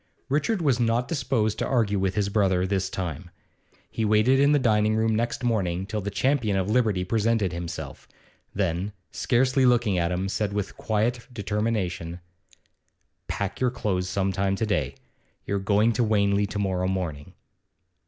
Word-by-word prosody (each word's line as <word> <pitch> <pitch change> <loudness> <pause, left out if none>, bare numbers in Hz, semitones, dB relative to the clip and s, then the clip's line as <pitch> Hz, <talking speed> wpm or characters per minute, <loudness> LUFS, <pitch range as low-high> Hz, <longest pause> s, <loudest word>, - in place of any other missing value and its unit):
Richard 170 +7 0
was 135 -5 +2
not 120 +1 +1
disposed 125 -8 0
to - - -1
argue 110 -6 +1
with 95 -1 0
his 105 -1 +1
brother 95 -3 +2
this 95 -1 -1
time. 90 -2 -5 0.6
He 110 - -2
waited 110 +5 +4
in 140 +1 +5
the 150 - +5
dining 110 -4 +2
room 110 0 +2
next 115 +3 -1
morning 95 -6 0
till 105 +1 -3
the 100 - -3
champion 110 -1 +1
of 95 0 0
liberty 110 -6 +2
presented 110 -1 +1
himself; 85 -1 -6 0.4
then, 95 +1 -1 0.2
scarcely 130 +2 +2
looking 120 -7 +3
at 85 +1 0
him, 90 +2 -1
said 100 +1 -2
with 105 -1 -3
quiet 115 +2 -1
determination: 100 -6 -2 1.1
'Pack 100 -1 -3
your 125 - +2
clothes 95 -6 -2
some 100 -2 0
time 95 +1 0
to 110 - -1
day. 75 -10 -1 0.5
You're 100 - -1
going 105 +4 +2
to 120 - +1
Wanley 100 -2 +2
to 100 - -5
morrow 95 -2 0
morning. 85 -6 -4
105 Hz, 165 wpm, -25 LUFS, 95-115 Hz, 1.1 s, in